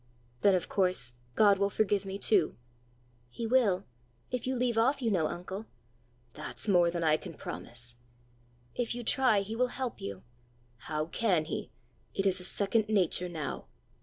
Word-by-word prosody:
"Then 200 -2 +5
of 180 -1 -1
course 180 - +2 0.2
God 200 -2 +5
will 200 0 +2
forgive 205 -1 +1
me 195 0 -4
too!" 195 -5 +2 0.7
"He 230 - -5
will 220 -6 +3 0.5
if 250 0 -2
you 260 - 0
leave 245 -1 +1
off, 255 +5 +3
you 235 -4 0
know, 170 -6 +2
uncle." 190 +6 -6 0.7
"That's 150 +7 -4
more 175 -4 +5
than 170 0 -2
I 155 -1 +4
can - - -9
promise." 120 0 -6 0.8
"If 240 -1 -2
you 240 - -5
try, 240 -4 +4
he 210 +3 -5
will 250 +2 +2
help 250 -1 -4
you." 100 -1 -6 0.5
"How 155 +4 -3
can 175 -2 +1
he? 160 - -4 0.5
It 195 - 0
is 190 -1 +3
a - - -7
second 210 +3 +1
nature 180 -3 +2
now!" 155 -6 -5
195 Hz, 165 wpm, -31 LUFS, 170-225 Hz, 0.8 s, Then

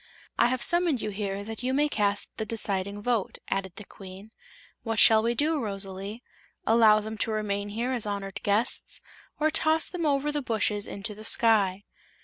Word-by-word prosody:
"I - - +5
have 255 0 -1
summoned 345 -6 +3
you 215 - -3
here 200 -1 -4
that 220 +1 -6
you 260 +1 -1
may 295 +2 +3
cast 205 -6 -1
the - - -2
deciding 205 -2 -3
vote," 235 -5 -1
added 195 -2 -2
the 210 - -9
Queen. 195 +3 -12 0.5
"What 225 -1 -3
shall 220 0 +7
we 235 +2 0
do, 305 +4 +1
Rosalie: 200 0 -3 0.4
allow 220 -1 +5
them 220 0 -7
to - - 0
remain 205 -1 -2
here 235 +5 -2
as 240 -5 0
honored 200 -1 -4
guests, 205 +3 +1 0.4
or 310 +1 +2
toss 315 +1 +2
them 340 -3 -2
over 285 +1 +1
the 295 0 -2
bushes 210 -4 0
into 200 +2 -4
the 215 +1 -12
sky?" 205 -4 +2
215 Hz, 180 wpm, -27 LUFS, 200-245 Hz, 0.5 s, shall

